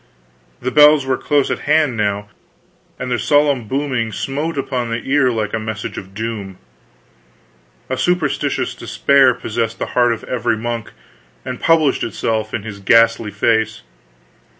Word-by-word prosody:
The 130 - -1
bells 150 -1 +6
were 130 0 +1
close 145 +1 0
at - - -2
hand 150 -5 +3
now, 105 -1 -1 0.7
and 125 0 -5
their 120 - 0
solemn 145 -6 +2
booming 130 -3 -1
smote 145 +9 -3
upon 130 -3 -2
the 115 0 -3
ear 135 -1 +2
like 110 -3 -2
a 110 - 0
message 110 -1 -5
of 95 0 -9
doom. 105 -4 -5 1.3
A 130 - -2
superstitious 180 +7 0
despair 135 -3 +3
possessed 115 -1 -3
the - - -3
heart 120 -1 +3
of 115 - -4
every 120 -3 -1
monk 115 0 -4 0.5
and 130 -1 -5
published 160 -4 +3
itself 110 0 -2
in 105 - -4
his 105 -2 -8
ghastly 115 +2 +3
face. 110 - 0
120 Hz, 150 wpm, -18 LUFS, 110-135 Hz, 1.3 s, bells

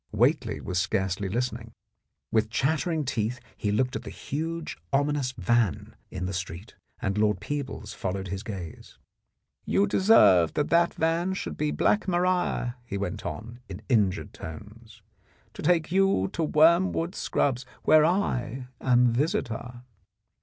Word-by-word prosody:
Whately - - +1
was 90 - -2
scarcely 95 0 -1
listening; 115 +1 -3 0.6
with 110 -1 +2
chattering 155 +5 0
teeth 115 0 -2 0.2
he 105 - -2
looked 125 +5 0
at - - -3
the - - -8
huge 165 +3 -4 0.2
ominous 145 -1 +1
van 115 - 0
in 90 0 -4
the 95 - -3
street, 95 +2 -6 0.3
and 100 +2 0
Lord 105 -1 +2
Peebles 140 -7 -5
followed 95 0 -4
his 100 +1 -4
gaze. 95 -7 -8 0.7
"You 95 +3 +2
deserve 100 - +5
that 150 - 0
that 170 0 +3
van 170 +3 0
should - - -4
be 150 0 -1
Black 210 +6 +1
Maria," 180 -8 0
he 100 -4 -5
went 100 +1 -4
on 115 +3 -7
in 95 +3 -8
injured 105 -7 +1
tones, 105 +8 -11 0.5
"to - - -8
take 170 -2 +2
you 195 - +2
to 165 - 0
Wormwood 170 +3 +3
Scrubs, 135 -9 0 0.2
where 155 -1 +6
I 130 - 0
am 125 -2 +4
visitor." 125 - -2
120 Hz, 140 wpm, -27 LUFS, 100-160 Hz, 0.7 s, where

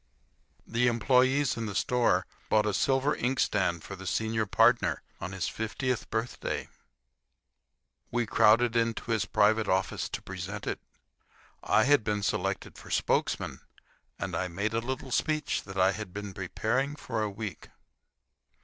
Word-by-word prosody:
The 120 +2 +1
employees 130 +3 +3
in 115 -1 -3
the 100 - -5
store 120 -6 +2 0.2
bought 105 -1 +4
a 105 - 0
silver 135 +5 +2
inkstand 100 -9 0
for 95 - -7
the 95 0 -9
senior 110 +1 0
partner - - +3 0.2
on 90 - -5
his 95 -2 -2
fiftieth 120 +2 -2
birthday. 115 +2 -3 1.4
We 120 0 0
crowded 115 +2 +4
into 115 0 0
his 110 -3 +1
private 110 0 +3
office 95 +1 0
to - - -4
present - - -6
it. - - -2 0.8
I - - +3
had 145 -3 +4
been 105 -1 -1
selected - - -2
for - - -12
spokesman, - - 0 0.6
and - - -4
I 90 - -1
made 100 +5 -2
a 115 - +2
little 130 +2 -4
speech 155 +4 0
that 95 -1 -8
I 95 +1 +5
had 100 -2 -6
been 105 -1 -5
preparing 120 +10 -1
for 120 -6 -3
a 105 - 0
week. 100 -3 -7
110 Hz, 150 wpm, -29 LUFS, 100-125 Hz, 1.4 s, I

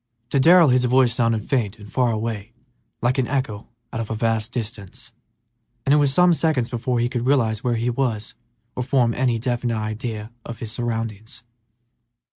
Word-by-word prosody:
To 140 - +2
Darrell 170 +2 +7
his 125 0 +3
voice 125 -1 +4
sounded 115 -2 +1
faint 115 -6 0
and 105 -1 -12
far 125 -3 +2
away, 110 0 -4 0.5
like 125 +3 +2
an 125 - +1
echo 130 -7 -2 0.3
out - - -3
of 115 - -4
a 110 - -2
vast 115 0 0
distance, 105 -5 -6 0.7
and 135 - +4
it - - +6
was 145 -2 +3
some 180 +4 +5
seconds 155 -8 0
before 125 0 -1
he 120 - +2
could 120 0 -3
realize 115 -6 +2
where 120 -1 +1
he 115 +2 0
was 115 -4 -2 0.4
or - - -2
form 125 -2 +2
any 125 -1 +1
definite 120 0 -1
idea 110 0 -4
of 120 - -7
his 110 -2 -6
surroundings. 115 -1 -4
120 Hz, 180 wpm, -22 LUFS, 110-130 Hz, 0.7 s, Darrell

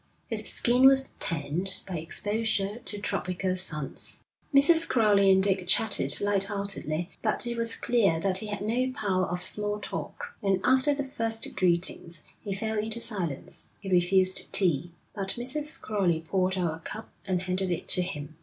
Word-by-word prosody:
His - - -1
skin 250 +2 +5
was 270 0 +4
tanned 165 +4 -2
by 180 -4 -4
exposure 205 +4 -1
to 205 - -5
tropical 185 -2 -2
suns. 155 -6 0 0.3
Mrs. 320 +4 +6
Crowley 205 -4 +4
and 190 0 +4
Dick 190 -2 +1
chattered 220 +3 +2
light 200 -1 +1
heartedly, 195 -5 -4
but 215 +2 -1
it 240 0 -2
was 230 0 +2
clear 200 -9 +2
that 185 +2 +1
he 215 - -5
had 205 -1 -4
no 245 +5 0
power 190 -4 0
of 180 +1 -1
small 210 0 0
talk, 480 - -6
and 195 -2 +1
after 260 +3 +3
the 280 0 -3
first 225 -3 -3
greetings 170 -3 0 0.2
he 205 - -6
fell 220 +2 -2
into 220 +2 -2
silence; 180 - -4
he 195 -2 -7
refused 185 +1 +3
tea, 175 -3 +1 0.2
but 195 -2 -3
Mrs. 290 +5 -4
Crowley 185 -6 0
poured 185 +3 0
out 175 -3 0
a 160 - -8
cup 220 +6 -8
and 185 -2 -1
handed 185 0 -1
it 175 - -3
to 180 - +4
him. 155 -4 -5
195 Hz, 170 wpm, -28 LUFS, 180-220 Hz, 0.3 s, Mrs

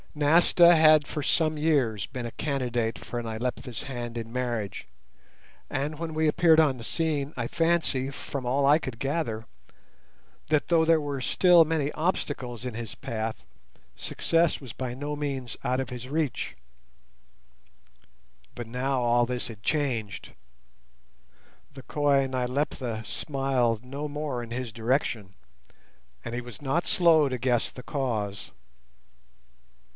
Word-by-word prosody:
Nasta 170 +3 +6
had 155 -2 +6
for 150 - -4
some 155 +1 +2
years 135 - +1
been 125 -3 -5
a 120 - -5
candidate 125 -6 -1
for 120 - -5
Nyleptha's 120 +2 -4
hand 120 -4 -5
in 115 0 -6
marriage, 120 -6 -3 0.8
and 150 +2 -2
when 165 -1 -4
we 155 0 +2
appeared 160 +1 +5
on 145 -5 +4
the 115 - -9
scene 150 +1 -1
I 120 -2 -1
fancy, 165 -5 +1
from 140 -1 -6
all 135 +3 +2
I 145 +2 +6
could 130 -7 -6
gather, 135 -6 -2 1.0
that 155 -1 +1
though 165 -2 +4
there 165 0 +4
were 145 -3 -3
still 175 +4 +6
many 155 -2 0
obstacles 140 - -2
in 125 - -3
his 115 0 -6
path, 110 -1 -4 0.5
success 165 -1 +1
was 130 -6 -9
by 130 -2 -4
no 145 +2 -4
means 135 -4 -4
out 130 +1 0
of 130 -1 -3
his 125 0 -7
reach. 150 -2 -2 2.0
But 120 -2 -7
now 130 +2 -1
all 120 0 +3
this 125 0 -2
had 105 -3 -10
changed; 125 -10 -2 1.4
the 135 -1 -10
coy 140 -2 +2
Nyleptha 125 -3 -2
smiled 130 -6 0
no 140 +3 -5
more 145 -4 -3
in 115 - -9
his 120 -2 -4
direction, 110 -4 -1 0.9
and 120 - -4
he 125 - -2
was 120 -2 -10
not 145 +5 0
slow 160 -5 +5
to 130 - -2
guess 120 -1 +1
the 125 - -11
cause. 110 -9 -3
135 Hz, 140 wpm, -27 LUFS, 120-150 Hz, 2.0 s, Nasta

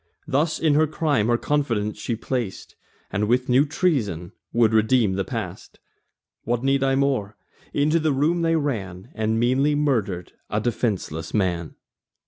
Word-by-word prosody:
Thus 150 +4 +1
in 155 -2 +3
her 155 +2 +4
crime 150 -8 +1
her 120 0 +3
confidence 115 -8 -1
she 115 - -2
plac'd, 115 -3 -4 0.4
And 105 +2 0
with 125 +2 +2
new 130 +4 +4
treasons 110 - 0 0.2
would 115 -2 +3
redeem 110 -1 +3
the 95 +1 -1
past. - - -6 0.7
What 120 +1 -1
need 135 0 +2
I 135 0 +2
more? 135 -7 0 0.3
Into 155 +3 +2
the 155 -1 +1
room 155 +6 +1
they 165 0 +2
ran, 110 - -3
And 110 0 0
meanly 135 +5 +2
murder'd 110 -12 0 0.2
a 105 - 0
defenceless 105 -8 -2
man. 85 -5 -1
120 Hz, 150 wpm, -23 LUFS, 105-145 Hz, 0.7 s, her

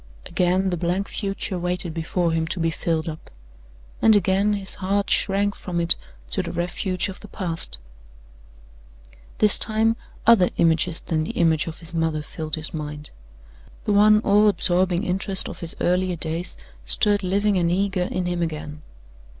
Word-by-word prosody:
Again 185 +2 +1
the 175 - -1
blank 180 +4 -1
future 195 -2 -3
waited 180 -1 -1
before 165 +1 -1
him 160 0 0
to 175 - -3
be 165 0 +1
filled 160 0 -2
up; 160 -1 -7 0.7
and 220 -1 +6
again 200 +1 +2
his 195 -2 -3
heart 200 +2 0
shrank 200 +1 +2
from 175 -3 -4
it 170 0 +3 0.4
to 190 - 0
the 180 - -5
refuge 180 +2 -2
of 195 -1 -8
the 210 - -11
past. 170 - -4 1.6
This 210 -1 +4
time 220 +1 +1 0.3
other 220 -6 +6
images 165 0 +3
than 155 -1 -1
the - - -5
image 160 -2 +2
of 165 - -6
his 165 0 -7
mother 160 -2 -1
filled 155 +1 -5
his 155 +2 -3
mind. 150 -1 -6 0.7
The 210 - 0
one 210 +1 +6
all 210 0 +4
absorbing 180 -1 +3
interest 190 0 +2
of - - -8
his 165 -1 -4
earlier 180 0 +1
days 165 +2 -3 0.3
stirred 205 - +2
living 200 +1 +1
and 170 -1 +1
eager 190 +1 0
in 180 0 -2
him 175 -1 -2
again. 150 -2 -4
180 Hz, 165 wpm, -23 LUFS, 165-195 Hz, 1.6 s, and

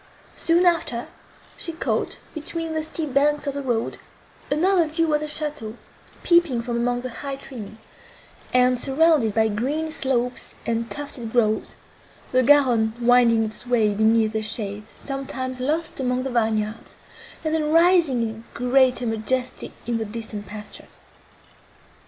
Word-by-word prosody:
Soon 340 +2 +2
after, 330 -9 +1 0.5
she 335 - -4
caught, 325 - -2 0.2
between 325 +1 -4
the 315 - -1
steep 310 -2 -4
banks 290 +1 +2
of 280 - -1
the 280 - -3
road, 240 -4 -2 0.5
another 340 +3 +3
view 320 0 0
of 300 - +3
the 305 - -4
château, 295 -8 -4 0.5
peeping 340 -8 +4
from 240 0 -3
among 245 +1 0
the 255 0 -5
high 275 -1 -3
trees, 225 -6 -8 0.7
and 250 0 +4
surrounded 275 -5 +3
by 220 0 +4
green 280 +10 -2
slopes 250 -5 -1
and 230 0 -1
tufted 280 -6 -5
groves, 220 -3 +1 0.6
the 255 - +4
Garonne 250 -5 +4
winding 240 -2 +4
its 220 +3 -5
way 225 -4 +3
beneath 220 +1 +3
their 220 - -1
shades, 210 0 -3
sometimes 260 -2 -4
lost 310 +5 -1
among 250 -1 0
the 265 - -3
vineyards, 220 -1 -1 0.5
and 315 -1 -1
then 305 -1 0
rising 330 -7 +4
in 220 +1 -8
greater 250 0 +3
majesty 245 +3 -2
in 235 -1 -1
the 220 - -2
distant 215 -1 -6
pastures. 210 +1 -11
250 Hz, 145 wpm, -23 LUFS, 225-300 Hz, 0.7 s, peeping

